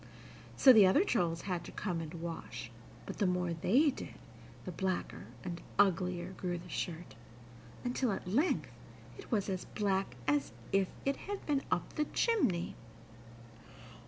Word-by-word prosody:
So 260 - +9
the 210 -4 +8
other 285 - +5
trolls 175 - 0
had 180 -3 -2
to - - -8
come 175 -5 -2
and 155 -1 -6
wash, 165 -9 -6 0.3
but, - - -7
the 200 - +3
more 180 -1 0
they 250 - +4
did, - - -8 0.5
the 185 - -4
blacker 185 - -2 0.2
and 170 -1 -5 0.2
uglier 180 -2 +2
grew 180 -2 -3
the 170 +1 -10
shirt, 170 0 -4 0.7
until 250 -1 0
at 190 - -4
length 275 - +1 0.5
it - - -11
was 210 -4 +1
as 190 -2 -2
black 195 - -1
as 145 -5 +1 0.2
if 195 -1 +3 0.2
it 275 0 +1
had 405 0 -6
been 285 -2 +1
up - - -1
the 300 - 0
chimney. 255 - +1
185 Hz, 155 wpm, -33 LUFS, 170-230 Hz, 0.7 s, So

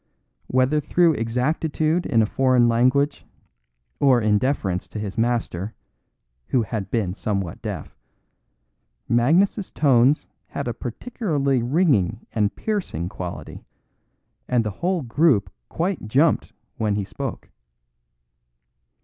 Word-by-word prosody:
Whether 130 +4 +2
through 170 +2 +3
exactitude 155 +7 0
in 115 -2 +3
a - - +2
foreign 130 +1 +3
language, 130 +5 +2 0.8
or 130 -3 +5
in 105 -2 +2
deference 100 -9 -1
to - - -8
his 100 -2 -5
master 115 -4 -1 0.7
(who 125 - +2
had 105 -2 -4
been 105 -7 -1
somewhat 100 -4 -3
deaf), - - -6 1.1
Magnus's 170 - +2
tones 135 -1 +3 0.2
had 140 - -5
a 120 - -1
peculiarly 140 - -1
ringing 120 - +1
and 105 -2 0
piercing 180 - -3
quality, 90 -2 -7 0.8
and 125 -2 +2
the 105 - -2
whole 180 -2 0
group 125 -2 +2 0.2
quite 170 - -2
jumped 145 +8 +2 0.3
when 105 -2 0
he 100 - -1
spoke. - - -6
125 Hz, 115 wpm, -23 LUFS, 110-150 Hz, 1.1 s, or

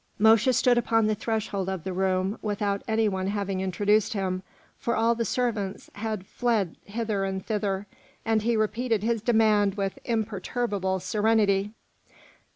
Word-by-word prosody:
Mosche 220 +3 +5
stood 245 0 +4
upon 225 -2 +2
the 215 - +2
threshold 210 -3 -2
of 190 -4 -4
the 190 - -4
room 190 +2 0
without 205 -1 -1
any 220 0 +2
one 190 -2 -1
having 200 -2 -2
introduced 205 +4 +1
him, 185 -2 -2 0.4
for 235 - -1
all 230 +1 +3
the 230 0 -1
servants 220 -5 -2
had 215 -2 -4
fled 220 -7 0
hither 210 -1 -2
and 190 -1 -3
thither; 205 -2 -1 0.4
and 225 -1 +2
he 230 +1 +1
repeated 220 0 0
his 230 -1 0
demand 215 -3 +3
with 195 -2 -3
imperturbable 210 -3 -1
serenity. 210 +1 +1
210 Hz, 150 wpm, -26 LUFS, 195-225 Hz, 0.4 s, Mosche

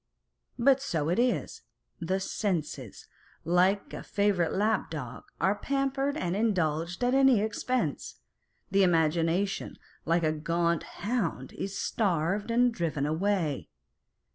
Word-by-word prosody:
But 265 +2 +4
so 160 - -1
it 180 - +1
is, 245 0 0 0.4
the 185 +3 -1
Senses, 155 - -3 0.4
like 180 +4 +2
a - - -5
favourite 200 -5 +1
lap 215 +3 +1
dog, 130 -6 -7
are 190 +3 +3
pampered 275 +5 -1
and 175 - -1
indulged 175 -4 0
at 245 +1 +2
any 270 -4 +5
expense: 215 - -2 0.6
the 195 +1 +4
Imagination, 170 +2 +1 0.3
like 170 +1 +1
a 155 - +3
gaunt 170 +2 0 0.2
hound, 195 - -2
is 195 0 -5
starved 195 0 0
and 240 +1 +3
driven 160 -8 -1
away. 160 -2 -1
190 Hz, 120 wpm, -29 LUFS, 165-220 Hz, 0.6 s, any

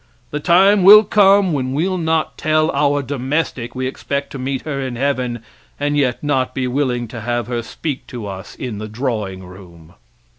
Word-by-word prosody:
The 150 - -2
time 190 +6 +4
will 210 +3 +10
come 200 -3 +4
when 130 -2 -2
we'll 180 +6 0
not 160 -1 0
tell 155 0 +1
our 145 0 +1
domestic 130 -2 -3
we 130 0 -2
expect 140 +1 -4
to 135 - -7
meet 130 0 -3
her 140 -3 -3
in 130 -2 -4
heaven, 125 -3 -2 0.4
and 145 0 0
yet 135 -3 0
not 135 -3 0
be 130 - -1
willing 125 -2 -1
to 115 - -7
have 120 +1 -2
her 120 -1 -3
speak 135 +4 -6
to 120 -4 -7
us 95 -1 -8
in 120 -6 -6
the 110 - -5
drawing 105 -5 -3
room. 90 -3 -14
135 Hz, 185 wpm, -18 LUFS, 120-150 Hz, 0.4 s, will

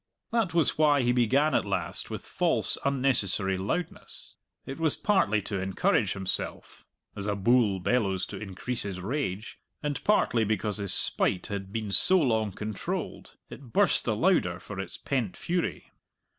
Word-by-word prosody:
That 220 -8 0
was 165 -2 +2
why 145 -3 +4
he 120 - +3
began 130 +5 +2
at - - +2
last 95 -4 -3
with - - -6
false, - - +1
unnecessary 120 -9 +1
loudness. 105 - -5 0.3
It 135 +4 -7
was 160 -3 +4
partly 110 - +1
to 100 -2 -3
encourage 95 0 +1
himself 95 0 -4 0.3
(as 100 0 -4
a 105 - 0
bull 105 -1 +3
bellows 95 -2 0
to - - -6
increase 105 +5 -4
his 95 -2 -4
rage), 105 -1 -4 0.2
and 145 -1 -3
partly 120 - +2
because 105 -1 -1
his 100 -2 -1
spite 90 - +2
had 95 -1 -5
been 110 -2 -4
so 185 - +5
long 110 - +1
controlled. 105 +1 -5
It 125 -5 -11
burst - - +3
the - - 0
louder - - +2
for - - -8
its - - -6
pent 125 -9 -2
fury. 175 0 -3
110 Hz, 155 wpm, -28 LUFS, 100-140 Hz, 0.3 s, so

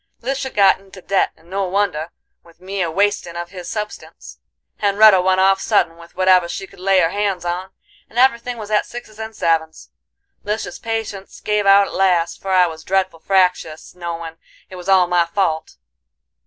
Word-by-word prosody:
"Lisha 270 +1 -2
got 195 -2 +4
into 195 0 -15
debt, 190 +1 +1
and 165 - -23
no 195 +2 -2
wonder, 180 -4 -1 0.3
with 170 -1 -21
me 190 +1 -4
a 170 - 0
wastin' 195 -1 0
of 175 0 -6
his 180 -3 -8
substance; 210 -1 -7 0.4
Hen'retta 205 -1 +6
went 185 +1 +2
off 195 0 +3
suddin', 200 -6 +1
with 170 0 -16
whatever 185 -2 +4
she 195 - -5
could - - -18
lay 190 0 +3
her 165 0 +1
hands 200 -4 -2
on, 180 +2 -3 0.4
and 230 - -12
everything 245 -1 +2
was 215 -1 -8
at 210 - +2
sixes 225 -2 -10
and 220 0 -7
sevens. 160 -1 -1 0.5
Lisha's 205 -3 -4
patience 220 -4 -5
give 210 -1 0
out 200 0 +7
at - - -10
last, 175 -3 +1
for 195 - -6
I 185 -1 +5
was 160 -2 -7
dreadful 190 -3 -1
fractious, 180 -4 0
knowin' 170 -2 -7 0.3
it - - -8
was 180 +1 -7
all 190 -2 +5
my 175 -1 +1
fault. 170 -4 -1
190 Hz, 180 wpm, -19 LUFS, 175-205 Hz, 0.5 s, out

